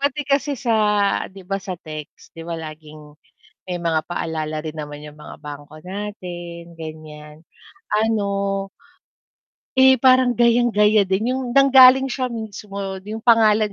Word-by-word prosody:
pati 285 +1 -1
kasi 280 +1 +1
sa 235 -3 -1 0.6
'di 190 0 -13
ba 195 - 0
sa 190 -1 -5
text 155 -1 -10
'di 165 - -8
ba 170 0 -5
laging 155 -1 -11 0.5
may 180 -1 -3
mga 165 -2 0
paalala 155 -3 -3
rin 155 - -5
naman 150 -1 -7
yung 150 0 -11
mga 150 - -11
bangko 145 +1 -10
natin, 175 -4 -7
ganyan. 155 -1 -10 0.6
Ano 200 -2 -1 1.1
eh 265 0 +6
parang 255 -1 +4
gayang-gaya 230 -3 +4
din 215 +6 0
yung 255 -1 -4
nanggaling 265 -1 +7
siya 260 -1 -2
mismo 215 -3 -8 0.3
yung 220 +1 -6
pangalan 220 -3 +4
195 Hz, 135 wpm, -21 LUFS, 155-240 Hz, 1.1 s, nanggaling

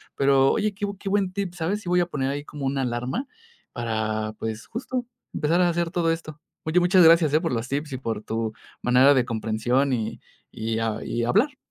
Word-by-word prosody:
pero 135 -1 +4
oye, 210 -1 0
qué 205 +1 -3
qué 195 - -5
buen 195 -2 +1
tip, 195 -3 -3
¿sabes? 175 +5 -2
Sí 175 - -6
voy 180 0 +3
a 175 - +3
poner 135 -6 -2
ahí 145 +1 -4
como 145 -2 -6
una 135 0 0
alarma 125 - -2 0.5
para, 110 -2 -2
pues, 110 0 -5
justo 245 +1 -4 0.3
empezar 160 +4 +1
a 180 - +4
hacer 170 -1 0
todo 170 -2 +1
esto. 155 -2 -8 0.2
Oye, 160 +3 +2
muchas 180 +1 +5
gracias, 165 -2 +6
eh, 155 - +4
por 165 - -1
los 115 0 -2
tips 145 +2 -3
y 130 - -3
por 115 -4 -4
tu 110 0 -2 0.3
manera 130 +3 +6
de 130 -3 +2
comprensión, 115 +4 0
y 115 -4 -2 0.3
y 110 0 -3
a 110 -1 -2
y 120 0 -2
hablar. 255 - +2
140 Hz, 210 wpm, -25 LUFS, 120-175 Hz, 0.5 s, gracias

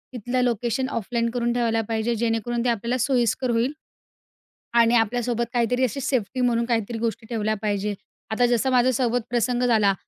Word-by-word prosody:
तिथलं 245 +2 -1
location 240 +2 0
offline 235 +1 -1
करून 240 -1 0
ठेवायला 230 -2 +1
पाहिजे, 225 +1 0
जेणेकरून 230 +1 -1
ते 245 - +3
आपल्याला 235 +2 -1
सोयीस्कर 250 0 +1
होईल. 235 +4 +1 1.0
आणि 235 0 +4
आपल्यासोबत 235 +1 +1
काहीतरी 245 +1 +1
अशी 255 +2 0
सेफ्टी 255 -3 -1
म्हणून 235 -1 +2
काहीतरी 230 -1 -1
गोष्टी 225 0 -3
ठेवल्या 215 -2 -1
पाहिजे. 205 -1 -1 0.4
आता 245 +3 +3
जसं 245 +2 +1
माझ्यासोबत 245 -1 +2
प्रसंग 245 +1 0
झाला, 215 -5 +3
235 Hz, 155 wpm, -24 LUFS, 225-245 Hz, 1.0 s, आणि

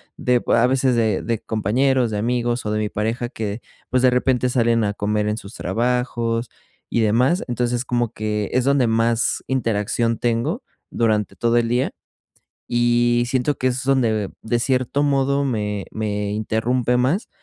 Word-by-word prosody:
de 125 -1 +2
b - - +1
a 115 +1 +4
veces 130 -1 +2
de 110 -4 +1
de 115 -1 -1
compañeros, 120 +4 +1
de 105 - -3
amigos, 120 +1 -1
o 105 - -1
de 105 - 0
mi 105 - 0
pareja 115 +4 -2
que 110 -3 -5 0.3
pues, 130 0 +2
de 130 - +5
repente 125 0 +1
salen 115 -3 +2
a 105 - -1
comer 105 +1 -1
en 105 - 0
sus 110 -1 -9
trabajos, 120 -1 -1 0.4
y 115 - +1
demás, 125 - +2
entonces, 120 0 -1
como 120 -2 -1
que, 105 -1 -2
es 125 - +2
donde 140 -2 +3
más 115 +1 +1
interacción 115 -2 0
tengo 120 - -1 0.3
durante 110 -4 0
todo 120 0 +1
el 115 -1 +1
día, 125 +2 +1 0.8
y 120 0 +2
siento 130 +2 0
que 130 - +1
es 130 +1 -1
donde, 115 -7 +1
de 115 +2 0
cierto 130 +2 0
modo, 140 0 +1
me 105 -5 -2
me 105 -1 -2
interrumpe 115 +3 0
más, 140 - 0
120 Hz, 170 wpm, -21 LUFS, 110-125 Hz, 0.8 s, de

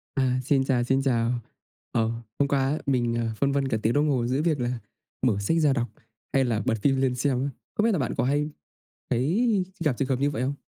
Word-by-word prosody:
À, 130 -2 +2
xin 135 0 +2
chào, 125 -3 +1
xin 135 +2 +2
chào. 120 -3 +1 0.6
Ờ, 115 -1 +1 0.3
hôm 140 - +3
qua 140 -1 +1
á 150 - 0
mình, 120 -3 +1
à, 115 -1 -1
phân 140 0 +2
vân 140 -1 +1
cả 115 - 0
tiếng 115 - +2
đồng 150 +1 +2
hồ 125 -4 +1
giữa 130 +4 +1
việc 155 -3 +1
là 120 -1 -1 0.5
mở 105 -4 +2
sách 100 +12 +1
ra 150 -3 +4
đọc, 120 -3 0 0.5
hay 135 - +4
là 115 -3 0
bật 125 -3 +2
phim 135 +1 +2
lên 130 -2 +1
xem 130 -1 0
á. 140 - -1 0.3
Không 210 - +1
biết 230 - +4
là 190 - +1
bạn 125 -4 -1
có - - +2
hay 145 +3 +1 0.6
thấy 185 - +2 0.2
gặp 145 -7 +1
trường 135 - 0
hợp 130 -1 0
như 140 - +2
vậy 140 -5 -3
không? 135 +2 -1
135 Hz, 245 wpm, -26 LUFS, 120-145 Hz, 0.6 s, ra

